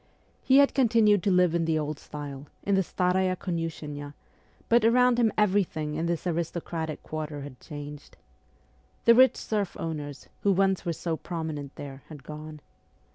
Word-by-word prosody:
He 265 Hz, -, +4 dB
had 280 Hz, 0 st, +6 dB
continued 225 Hz, -6 st, +4 dB
to 200 Hz, -, +1 dB
live 180 Hz, -2 st, +4 dB
in 170 Hz, -1 st, +1 dB
the 160 Hz, -1 st, +1 dB
old 150 Hz, -1 st, -3 dB
style, 145 Hz, -1 st, -8 dB, 0.2 s
in 200 Hz, -, 0 dB
the 195 Hz, -, +4 dB
Staraya 185 Hz, +1 st, +1 dB
Komishennaya, 150 Hz, -5 st, -4 dB, 0.5 s
but 235 Hz, 0 st, +4 dB
around 245 Hz, +1 st, +4 dB
him 225 Hz, -3 st, +4 dB
everything 185 Hz, -7 st, +1 dB
in 160 Hz, +2 st, -1 dB
this 170 Hz, 0 st, -2 dB
aristocratic 165 Hz, -2 st, -3 dB
quarter 155 Hz, -2 st, -5 dB
had 140 Hz, -3 st, -9 dB
changed. 145 Hz, -1 st, -9 dB, 0.9 s
The 235 Hz, -, +8 dB
rich 260 Hz, +2 st, +6 dB
serf 205 Hz, -4 st, -2 dB
owners, 150 Hz, -3 st, -5 dB
who 200 Hz, -, +3 dB
once 190 Hz, 0 st, +2 dB
were 170 Hz, -, 0 dB
so 165 Hz, 0 st, -3 dB
prominent 155 Hz, -5 st, -5 dB
there, 140 Hz, -1 st, -8 dB
had 150 Hz, -4 st, -11 dB
gone. 155 Hz, +1 st, -9 dB
165 Hz, 160 wpm, -27 LUFS, 150-195 Hz, 0.9 s, The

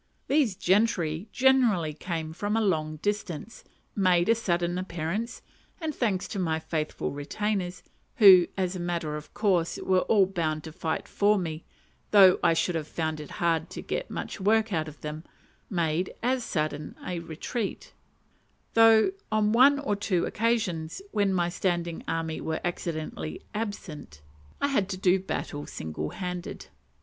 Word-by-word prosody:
These 270 Hz, -8 st, +2 dB
gentry 185 Hz, -3 st, +1 dB
generally 245 Hz, -12 st, +3 dB
came 160 Hz, 0 st, -4 dB
from 205 Hz, +5 st, -1 dB
a -, -, +3 dB
long 155 Hz, -7 st, 0 dB
distance, 205 Hz, -1 st, -3 dB, 0.3 s
made 180 Hz, -2 st, +3 dB
a -, -, +7 dB
sudden 175 Hz, -5 st, 0 dB
appearance, 185 Hz, +5 st, -4 dB, 0.4 s
and, 320 Hz, -3 st, -3 dB
thanks 205 Hz, -8 st, 0 dB
to 200 Hz, -, -4 dB
my 160 Hz, -3 st, 0 dB
faithful 160 Hz, -1 st, -3 dB
retainers 180 Hz, +6 st, -3 dB, 0.3 s
who, 190 Hz, -6 st, +8 dB
as 185 Hz, -1 st, -1 dB
a -, -, -4 dB
matter 170 Hz, -3 st, -2 dB
of 150 Hz, 0 st, -8 dB
course, 185 Hz, -6 st, +1 dB
were 185 Hz, -1 st, +2 dB
all 200 Hz, 0 st, +4 dB
bound 160 Hz, -5 st, -2 dB
to 160 Hz, -, -8 dB
fight 160 Hz, -1 st, -3 dB
for 205 Hz, +1 st, +3 dB
me, 160 Hz, -3 st, -4 dB, 0.4 s
though 195 Hz, -3 st, +7 dB
I 165 Hz, -, +4 dB
should 180 Hz, -, +1 dB
have 160 Hz, -2 st, -3 dB
found 160 Hz, -1 st, -2 dB
it 150 Hz, -, -8 dB
hard 165 Hz, -2 st, +1 dB
to -, -, -7 dB
get -, -, -3 dB
much -, -, -5 dB
work 220 Hz, +2 st, +2 dB
out 160 Hz, -2 st, 0 dB
of 150 Hz, -1 st, -11 dB
them 155 Hz, +1 st, -6 dB, 0.5 s
made 170 Hz, -1 st, 0 dB
as 255 Hz, 0 st, +1 dB
sudden 155 Hz, -6 st, -3 dB
a 180 Hz, -2 st, -3 dB
retreat; 170 Hz, +7 st, -5 dB, 0.8 s
though 225 Hz, +7 st, +6 dB, 0.2 s
on 215 Hz, -1 st, +2 dB
one 265 Hz, +5 st, +6 dB
or 275 Hz, -8 st, -1 dB
two 200 Hz, -3 st, 0 dB
occasions, 210 Hz, -, -1 dB
when 200 Hz, -2 st, +2 dB
my 175 Hz, -2 st, +1 dB
standing 175 Hz, -1 st, -2 dB
army 165 Hz, -1 st, -2 dB
were 160 Hz, 0 st, -2 dB
accidentally 155 Hz, -, -4 dB
absent, 165 Hz, -, -6 dB, 0.4 s
I 285 Hz, -, +1 dB
had 205 Hz, -8 st, +1 dB
to 190 Hz, -, -3 dB
do 185 Hz, 0 st, +3 dB
battle 145 Hz, -5 st, -4 dB
single 75 Hz, -1 st, -5 dB
handed. 180 Hz, -2 st, -6 dB
180 Hz, 155 wpm, -27 LUFS, 160-210 Hz, 0.8 s, who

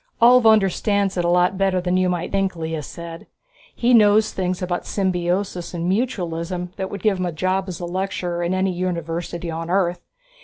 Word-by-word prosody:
"Ulv 245 Hz, 0 st, +6 dB
understands 200 Hz, -1 st, +1 dB
it 175 Hz, -, 0 dB
a 170 Hz, -, +1 dB
lot 180 Hz, +2 st, +2 dB
better 190 Hz, -1 st, +2 dB
than 180 Hz, 0 st, -1 dB
you 185 Hz, 0 st, +2 dB
might 175 Hz, -1 st, -2 dB
think," 195 Hz, -2 st, 0 dB
Lea 160 Hz, -1 st, -3 dB
said. 165 Hz, +3 st, -9 dB, 0.5 s
"He 245 Hz, +1 st, +2 dB
knows 215 Hz, -1 st, +5 dB
things 185 Hz, -1 st, -2 dB
about 175 Hz, -1 st, -3 dB
symbiosis 180 Hz, -1 st, -1 dB
and 170 Hz, 0 st, -2 dB
mutualism 180 Hz, -5 st, -2 dB
that 190 Hz, 0 st, -4 dB
would 200 Hz, -2 st, -7 dB
get 210 Hz, -3 st, +2 dB
him 185 Hz, -, 0 dB
a -, -, -2 dB
job 185 Hz, +4 st, -1 dB
as 180 Hz, -3 st, -6 dB
a 175 Hz, -, -4 dB
lecturer 180 Hz, -1 st, -3 dB
in 175 Hz, +2 st, 0 dB
any 190 Hz, 0 st, +1 dB
university 170 Hz, -1 st, -3 dB
on 165 Hz, +1 st, -5 dB
Earth. 180 Hz, -1 st, +1 dB
180 Hz, 190 wpm, -22 LUFS, 175-195 Hz, 0.5 s, Ulv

